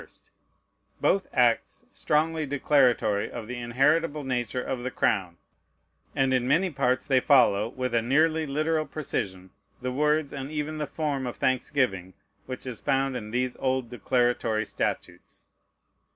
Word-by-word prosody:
1st, - - -16 0.7
both 195 - +2
acts 120 -3 +1
strongly 155 0 0
declaratory 130 -7 +2
of 120 -2 -7
the 125 0 -5
inheritable 145 +6 +1
nature 125 -2 -2
of 130 -2 -3
the 130 - -3
crown; 95 -8 0 0.8
and 135 -2 +2
in 125 -1 +1
many 180 +7 +2
parts 130 -3 0
they 130 -2 +3
follow, 120 -7 +4
with 130 -1 -4
a 115 - +3
nearly 155 +6 +2
literal 155 +2 0
precision, 95 -11 -4 0.3
the 125 0 -3
words, 150 +2 +1
and 135 0 -5
even 155 0 -3
the 150 - -2
form 140 -3 -2
of 120 - -5
thanksgiving 125 -8 0 0.3
which 130 0 -6
is 125 -3 -6
found 135 -1 0
in 105 -4 -5
these 125 +2 -1
old 130 -2 -1
declaratory 120 -3 0
statutes. 90 -3 -5
130 Hz, 145 wpm, -27 LUFS, 120-150 Hz, 0.8 s, follow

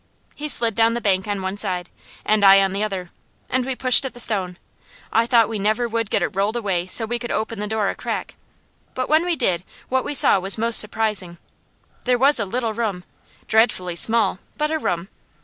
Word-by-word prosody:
He 300 +1 -6
slid 230 -4 +2
down 230 +1 +2
the - - -1
bank 190 -3 0
on 200 -2 -3
one 190 +2 -4
side, 180 -3 -2 0.4
and 215 -1 +2
I 195 0 +8
on 190 -1 -1
the 200 +2 -1
other, 190 -4 -4 0.4
and 255 0 +1
we 265 +1 -3
pushed 255 +1 +4
at 265 - -5
the - - -9
stone. 190 -6 -1 0.6
I 230 +1 +2
thought 230 -3 +4
we 225 -2 -4
never 215 +4 0
would 230 -2 -3
get - - 0
it - - 0
rolled 200 +4 0
away 190 -6 -2
so 225 +4 +2
we 240 +2 -3
could 240 0 -6
open 220 0 -3
the 210 - -3
door 215 -1 -1
a - - -1
crack, - - -5 0.6
but 255 0 -3
when 310 +2 +3
we 350 -1 0
did 185 - 0 0.3
what 260 0 0
we 290 - -4
saw 200 - +4
was 195 +3 0
most 230 +1 +5
surprising. 210 -5 +1 0.7
There 250 -1 +2
was 275 +2 +4
a 205 - 0
little 230 +2 -2
room, 210 -5 -3 0.4
dreadfully 200 -6 +1
small, 215 0 +1 0.2
but 300 0 -1
a 315 - -1
room. 175 - -2
220 Hz, 220 wpm, -21 LUFS, 195-240 Hz, 0.7 s, I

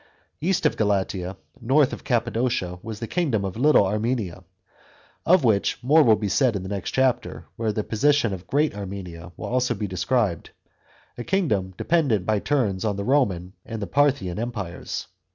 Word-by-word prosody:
East 180 +3 0
of - - +2
Galatia, 95 -3 -1 0.2
north 135 +4 +3
of - - -7
Cappadocia, 115 -7 -1
was 110 -1 -7
the 115 - -3
kingdom 120 - 0
of 95 - -4
Little 135 -3 +4
Armenia, 105 -3 -2 0.8
of 180 -2 +5
which 110 -5 +2
more 150 +6 +5
will 115 -7 +6
be 105 -1 -3
said 120 +4 +2
in 95 - -3
the 95 - -6
next 100 -2 -3
chapter, 130 -1 0
where 110 -1 -1
the 105 0 -2
position 120 0 +2
of 90 -1 -8
Great 150 0 +1
Armenia 90 -4 -7
will - - -6
also 125 -1 0
be 105 - -3
described, 95 0 -1 0.7
a - - -3
kingdom 105 - 0
dependent 140 - +1
by 110 -1 +1
turns 105 -8 0
on 105 -2 0
the 100 - -3
Roman 95 -10 +1
and 115 - -6
the 100 - -3
Parthian 130 -5 +1
empires. 105 -7 -4
110 Hz, 170 wpm, -24 LUFS, 95-130 Hz, 0.8 s, will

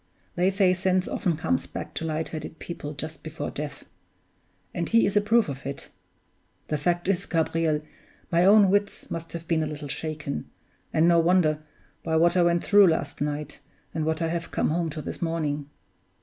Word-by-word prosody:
they 180 +2 +2
say 195 -2 +3
sense 185 0 +1
often 170 -4 -1
comes 120 - 0
back - - -7
to - - -4
light 160 0 -2
headed 155 0 -6
people 155 -4 -6
just 155 +2 -7
before 160 -1 -5
death; 150 0 -6 0.9
and 170 - -2
he 230 0 +5
is 200 - -1
a 205 - +5
proof 225 +2 +3
of 140 -1 -6
it. 140 0 -6 0.8
The 150 - +1
fact 175 +4 0
is, 195 -2 0
Gabriel, 160 -2 +1 0.5
my 170 0 +4
own 200 0 +7
wits 205 0 -1
must 165 0 -5
have 170 -1 -6
been 165 -2 +2
a 155 - -1
little 150 -1 -6
shaken 155 0 -4 0.4
and 160 +2 +3
no 170 -1 +5
wonder 165 -3 +3 0.4
by 160 -1 0
what 170 +2 +4
I 180 - +5
went 170 0 +3
through 205 -1 +6
last 145 -4 -1
night, 150 0 -3 0.3
and 160 - -1
what 160 +1 0
I 165 - 0
have 170 0 -3
come - - 0
home 170 0 0
to 155 0 -6
this - - -6
morning. 150 -4 -2
165 Hz, 190 wpm, -26 LUFS, 155-180 Hz, 0.9 s, own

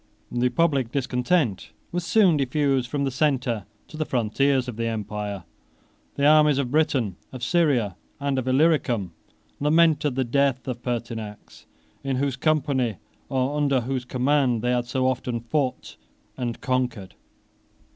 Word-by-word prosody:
The 125 +1 +1
public 140 -6 +1
discontent 125 - 0 0.2
was 175 0 -2
soon 180 0 +4
diffused 135 -2 +1
from 140 +2 -1
the 135 - 0
centre 130 -5 0 0.2
to 155 - -11
the 155 - 0
frontiers 130 +1 +1
of 125 - -5
the 115 +1 -2
empire. 105 -3 -4 0.7
The 140 - +1
armies 150 -1 +6
of 130 -3 -1
Britain, 140 - +1
of 130 -2 -8
Syria, 125 - +2 0.2
and 140 -2 0
of 130 - -4
Illyricum, 130 - +2 0.5
lamented 150 -2 +3
the 135 - +1
death 130 0 +1
of 120 -2 -4
Pertinax, 110 -9 -6 0.4
in 135 -1 -1
whose 135 0 0
company, 130 - 0 0.3
or 130 +2 0
under 140 -3 +2
whose 130 +1 -3
command, 130 -2 +1
they 125 - +1
had 120 -1 0
so 130 +1 0
often 125 -2 -1
fought 130 +3 -2 0.4
and 120 -3 -4
conquered. 125 -7 -2
130 Hz, 145 wpm, -24 LUFS, 120-145 Hz, 0.7 s, armies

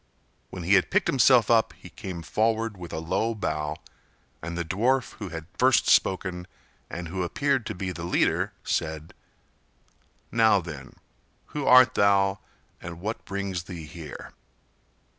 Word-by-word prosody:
When 90 - -7
he 95 +4 +2
had 100 - +4
picked 205 -1 +2
himself 130 -7 +4
up 115 -1 +3
he - - -13
came 90 -3 -7
forward 110 +3 0
with 90 -2 -9
a - - -4
low 95 +8 -1
bow, 75 -6 -2 0.7
and 85 +2 -5
the 85 - -2
dwarf 120 +9 +1
who 100 -4 -5
had 80 -1 -7
first - - +4
spoken 90 -1 +2 0.4
and 85 -1 -6
who 95 +2 -3
appeared 135 +6 0
to - - -4
be 90 0 -3
the 85 - -7
leader 85 - +1
said: 80 0 -3 1.2
"Now, 110 -3 +4
then, 80 -7 -9 0.6
who 145 -2 -3
art 125 0 +7
thou 100 -1 +3 0.4
and 85 -1 -8
what 110 +5 -5
brings 95 -3 -4
thee 85 -4 -8
here?" 80 -2 -10
95 Hz, 150 wpm, -26 LUFS, 85-110 Hz, 1.2 s, art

